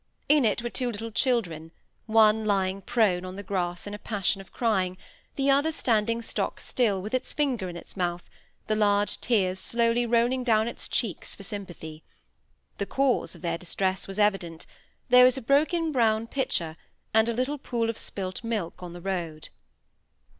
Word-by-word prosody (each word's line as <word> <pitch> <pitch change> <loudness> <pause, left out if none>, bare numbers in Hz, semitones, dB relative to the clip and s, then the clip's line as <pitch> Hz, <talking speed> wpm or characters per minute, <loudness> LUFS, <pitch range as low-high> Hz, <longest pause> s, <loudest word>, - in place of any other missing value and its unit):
In 290 -3 +5
it 220 +2 +1
were 240 - -2
two 250 -2 -2
little 225 +1 -6
children, 190 - 0 0.4
one 220 0 +5
lying 195 -2 0
prone 195 -6 +2
on 185 0 -7
the 200 - -7
grass 180 -3 -2
in 205 - -6
a 210 - -6
passion 200 -2 -1
of 195 - -16
crying, 190 -6 0 0.4
the 275 0 +3
other 285 +4 +3
standing 230 -4 +1
stock - - -2
still, 215 -6 +1
with 210 +5 -6
its 255 0 -1
finger 250 -11 0
in 170 - -7
its - - -10
mouth, 175 -2 -2 0.4
the 215 - 0
large 205 -1 +2
tears 190 -6 +1
slowly 235 +3 +1
rolling 240 +2 +2
down 220 -2 +3
its 235 - -6
cheeks 220 -8 -2
for 200 - -11
sympathy. 175 -6 -6 0.8
The 200 - -2
cause 270 -2 +1
of - - -15
their 170 -1 -1
distress 190 +2 -2
was 195 0 -5
evident; 195 -6 0 0.4
there 250 0 +8
was 255 +1 +5
a - - -1
broken 310 +6 +2
brown 225 -4 +2
pitcher, 170 - -2 0.4
and 220 +1 +4
a - - 0
little 255 +5 -1
pool 235 -4 -1
of 230 - -3
spilt 185 +1 -3
milk 215 -8 -3
on 175 -1 -7
the 175 - -9
road. 170 -5 -4
215 Hz, 180 wpm, -27 LUFS, 185-240 Hz, 0.8 s, there